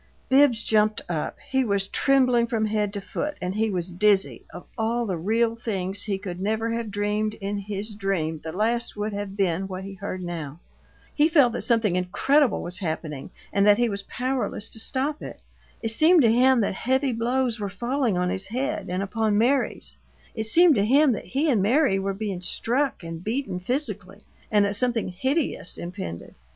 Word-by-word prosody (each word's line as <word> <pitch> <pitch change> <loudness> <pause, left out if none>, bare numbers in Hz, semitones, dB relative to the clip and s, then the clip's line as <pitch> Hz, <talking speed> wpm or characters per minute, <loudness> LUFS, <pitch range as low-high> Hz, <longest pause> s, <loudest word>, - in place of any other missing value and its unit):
Bibbs 265 -4 +4
jumped 215 0 +2
up. 160 -3 -3
He 265 0 +3
was 200 -4 0
trembling 255 -4 +3
from 225 -2 0
head 210 -1 0
to 200 - -3
foot 295 +9 -4
and 180 +1 -3
he 220 +2 0
was 180 -2 -3
dizzy 200 +1 +2
of 175 - -10
all 235 +1 0
the 190 -4 -2
real 225 +7 +1
things 200 -4 -3
he 200 -2 -1
could 185 -2 -7
never 220 +3 -1
have 230 -1 -3
dreamed 210 +1 -1
in 200 0 -4
his 205 +2 -4
dream 180 -6 -2
the 160 - -5
last 225 +5 -1
would 210 +1 -2
have 200 -1 -5
been 190 -1 0
what 185 0 -6
he 195 0 -7
heard 190 -1 -6
now. 165 -4 -6 0.5
He 305 +2 +3
felt 280 -8 +4
that - - -3
something 225 -6 +2
incredible 230 +10 +2
was 180 +1 -4
happening, 155 -5 -4 0.2
and 200 - +3
that 205 0 +6
he 240 0 +2
was 200 -1 -3
powerless 250 -1 -2
to 225 - -6
stop 275 +6 -2
it. - - -8 0.4
It 225 - 0
seemed 315 +6 +5
to 225 - +5
him 255 +1 +4
that 200 - 0
heavy 260 +6 0
blows 240 0 0
were 205 -1 -3
falling 240 0 -1
on 180 0 0
his 190 0 -3
head 270 +7 -3
and 185 +2 -1
upon 210 +1 0
Mary's; 255 +5 0 0.3
it 220 -1 -2
seemed 330 +9 +6
to 200 -6 +2
him 275 +6 +4
that 215 - -3
he 275 - -1
and 220 -6 +2
Mary 230 -1 +3
were 195 0 -2
being 195 -3 -4
struck 245 +5 -1
and 165 0 -7
beaten 215 -4 -2
physically 210 -3 -3 0.3
and 205 -1 +4
that 200 0 -1
something 235 -2 0
hideous 260 - -1
impended. 175 - -7
210 Hz, 190 wpm, -25 LUFS, 195-245 Hz, 0.5 s, that